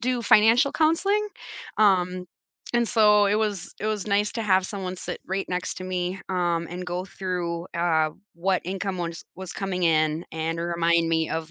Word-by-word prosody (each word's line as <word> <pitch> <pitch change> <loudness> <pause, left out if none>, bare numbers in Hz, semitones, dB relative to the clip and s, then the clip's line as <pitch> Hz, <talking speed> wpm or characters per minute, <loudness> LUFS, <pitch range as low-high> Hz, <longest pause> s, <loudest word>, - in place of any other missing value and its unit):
do 250 0 0
financial 230 +6 +5
counseling, 390 +7 +2 0.5
um, 185 -3 +3 0.5
and 240 0 +3
so, 210 -2 +5
it 200 - +2
was 205 -4 -2
it 215 - -2
was 215 -2 -2
nice 205 +1 +2
to 230 - -3
have 190 -2 +3
someone 190 -3 -5
sit - - -6
right 190 +1 -2
next 180 0 -2
to 185 - -6
me, 185 +1 -2
um, 175 -2 0
and 180 +1 -6
go 180 +1 -3
through, 175 -3 -4
uh, 160 -2 +2 0.2
what 185 +2 0
income 190 +1 -3
was 170 -2 -4
was 190 -1 -7
coming 190 -2 -3
in 155 0 +2
and 160 +1 -2
remind 170 -1 +2
me 160 -1 +1
of, 160 -1 -3
185 Hz, 175 wpm, -25 LUFS, 170-205 Hz, 0.5 s, financial